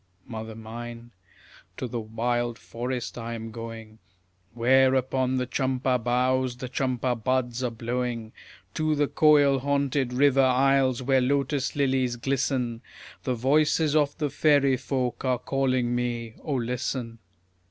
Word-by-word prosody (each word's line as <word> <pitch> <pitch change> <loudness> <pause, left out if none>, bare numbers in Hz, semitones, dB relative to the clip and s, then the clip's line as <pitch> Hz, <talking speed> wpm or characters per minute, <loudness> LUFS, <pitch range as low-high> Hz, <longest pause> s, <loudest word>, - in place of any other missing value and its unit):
Mother 110 -1 -7
mine, 115 +1 -8 0.7
to 130 - -3
the 120 0 -4
wild 120 +2 -2
forest 125 0 -5
I 115 0 -4
am 115 0 -7
going, 115 -1 -8 0.6
Where 130 +2 +4
upon 130 0 0
the 125 - 0
champa 130 0 0
boughs 125 +1 +1
the 130 0 -6
champa 130 -1 0
buds 125 +1 -1
are 125 - +1
blowing; 115 -1 -3 0.4
To 155 -1 0
the 145 0 +2
koil 145 -3 +4
haunted 140 -1 0
river 135 +1 +4
isles 130 -1 +3
where 135 0 +3
lotus 140 +1 0
lilies 130 -3 +1
glisten, 125 -2 -1 0.4
The 130 - 0
voices 150 +4 +2
of 145 -2 +2
the 150 -4 -1
fairy 140 -3 +3
folk 125 -1 -2
are 130 -1 +1
calling 130 -1 0
me: 120 -2 -2
O 145 - -2
listen! 125 -1 -3
125 Hz, 135 wpm, -26 LUFS, 120-135 Hz, 0.7 s, Where